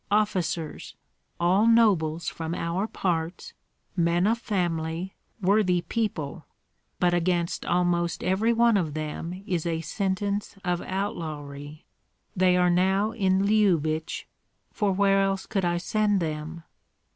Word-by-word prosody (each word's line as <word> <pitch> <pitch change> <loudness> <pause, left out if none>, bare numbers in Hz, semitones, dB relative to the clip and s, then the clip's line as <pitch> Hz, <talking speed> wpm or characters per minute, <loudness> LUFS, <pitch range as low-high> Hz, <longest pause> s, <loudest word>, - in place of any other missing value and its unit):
Officers, 185 -6 -1 0.4
all 185 +6 +3
nobles 175 -8 +3
from 165 +1 -3
our 180 +5 -1
parts, 170 -4 -3 0.4
men 170 0 +2
of 225 +2 +2
family, 175 -4 -2 0.3
worthy 185 -2 +3
people, 170 -5 -3 0.6
but 175 -1 +3
against 175 0 0
almost 175 -1 +1
every 195 +5 +2
one 235 -1 +4
of 160 -6 -2
them 165 +4 -5
is 180 -6 -1
a 165 -1 -1
sentence 200 +3 -2
of 175 -1 0
outlawry. 155 -6 -5 0.5
They 180 0 +4
are 180 0 +4
now 190 +4 +2
in 195 -3 +1
Lyubich, 170 -7 +1 0.5
for 205 -2 0
where 195 +1 +3
else 195 0 0
could 195 -4 -1
I 175 0 +1
send 205 +3 +1
them?" 160 0 -4
180 Hz, 120 wpm, -26 LUFS, 165-200 Hz, 0.6 s, one